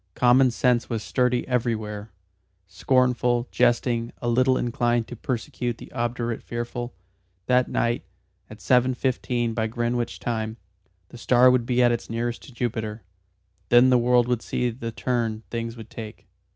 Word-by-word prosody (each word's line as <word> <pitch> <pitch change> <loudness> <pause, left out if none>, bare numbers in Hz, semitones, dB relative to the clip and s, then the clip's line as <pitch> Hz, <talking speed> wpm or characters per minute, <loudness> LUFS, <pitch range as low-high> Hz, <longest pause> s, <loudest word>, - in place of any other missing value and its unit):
Common 125 +1 +5
sense 120 0 +1
was 115 -2 -2
sturdy 125 -1 0
everywhere, 110 -4 -2 0.6
scornful, 125 +4 +1
jesting, 120 -1 +1
a 120 - -4
little 130 +2 +3
inclined 120 -1 0
to 120 - -6
persecute 120 0 -3
the - - -12
obdurate 120 -1 -2
fearful. 120 +1 -5 0.5
That 125 +2 +3
night, 120 +1 0 0.5
at 110 -1 -12
seven 125 +6 +3
fifteen 120 -2 -1
by 110 -1 -1
Greenwich 120 +1 -2
time, 110 -1 -3 0.5
the 120 - -12
star 125 +1 +5
would 125 -2 +1
be 125 0 +3
at 120 - +5
its 120 - -3
nearest 115 +1 -3
to - - -13
Jupiter. 110 -3 -3 0.7
Then 120 +2 +6
the 125 - +5
world 120 0 +3
would 125 -2 0
see 125 -1 -1
the 115 0 -6
turn 115 -2 -2
things 115 0 -4
would 110 - -11
take. 110 -2 -9
120 Hz, 150 wpm, -25 LUFS, 115-125 Hz, 0.7 s, Then